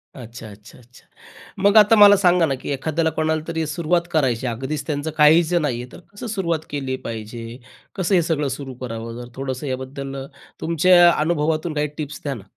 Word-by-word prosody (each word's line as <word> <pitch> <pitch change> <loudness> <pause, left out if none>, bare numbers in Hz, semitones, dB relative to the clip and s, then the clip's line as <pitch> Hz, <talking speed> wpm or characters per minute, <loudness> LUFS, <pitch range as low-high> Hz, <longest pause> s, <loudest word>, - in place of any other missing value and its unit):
अच्छा, 115 -3 -10
अच्छा, 105 +3 -16
अच्छा. 125 +1 -20 0.6
मग 200 +2 +5
आता 215 +1 +7
मला 205 -1 +8
सांगा 180 -3 +3
ना, 135 -3 -1
की - - -7
एखाद्याला 160 +4 -1
कोणाला 155 0 0
तरी 160 -1 -2
सुरुवात 170 +3 -1
करायची 130 -6 0
आहे 115 - -2
अगदीच 140 +3 -4
त्यांचं 150 +1 -3
काहीच 160 +3 +5
नाहीये 135 -8 0
तर - - -12
कसं 205 +4 -7
सुरुवात 185 -7 -1
केली 135 -2 -3
पाहिजे, 115 +1 -7 0.4
कसं 190 +1 +1
हे 175 - +4
सगळं 155 -3 -1
सुरू 135 -2 -8
करावं? 115 -1 -6
जर 120 - -10
थोडंसं 135 +1 -4
याबद्दल 135 +1 -5 0.5
तुमच्या 175 +1 +5
अनुभवातून 155 0 0
काही 150 0 0
टिप्स 150 -1 -6
द्या 140 -2 -2
ना. 110 -7 -9
150 Hz, 180 wpm, -21 LUFS, 130-170 Hz, 0.6 s, मला